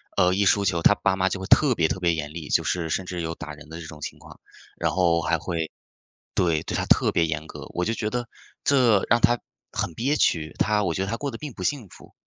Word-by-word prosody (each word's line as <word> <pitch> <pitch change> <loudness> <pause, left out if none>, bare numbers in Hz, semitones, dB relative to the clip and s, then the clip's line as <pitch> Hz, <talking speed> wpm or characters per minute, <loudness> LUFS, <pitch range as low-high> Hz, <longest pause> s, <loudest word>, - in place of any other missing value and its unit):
呃， 90 0 +4
一 100 +1 +2
输 100 +1 +4
球， 85 -4 +1
他 105 - +6
爸 95 - +1
妈 95 0 +2
就 95 - -2
会 95 - -4
特 140 +1 +5
别 80 -4 +3
特 95 - -2
别 85 -2 +2
严 75 -2 -4
厉， 80 -3 -6
就 - - +2
是 85 -3 -1
甚 95 +3 -1
至 90 -1 -4
有 80 0 -3
打 75 - -7
人 75 +1 -13
的 80 +1 -7
这 - - -8
种 75 -1 -10
情 - - -6
况， - - -15 0.4
然 - - +1
后 85 -2 +3
还 - - +1
会 80 -2 -3 0.7
对， 85 -4 +2
对 - - -3
他 - - 0
特 - - +4
别 85 - +3
严 80 0 -3
格， - - -9
我 90 - 0
就 115 - 0
觉 110 -2 -2
得 120 -1 -2 0.4
这 120 -8 +4
让 115 +2 +4
他 120 +1 +4 0.3
很 85 - -3
憋 135 - 0
屈， 80 - +1
他 105 +1 +2
我 85 - 0
觉 95 - -1
得 - - -5
他 115 - -1
过 140 +3 -3
得 115 - -8
并 150 -4 -6
不 95 - -9
幸 125 +1 -1
福。 - - -16
90 Hz, 290 characters per minute, -25 LUFS, 80-110 Hz, 0.7 s, 他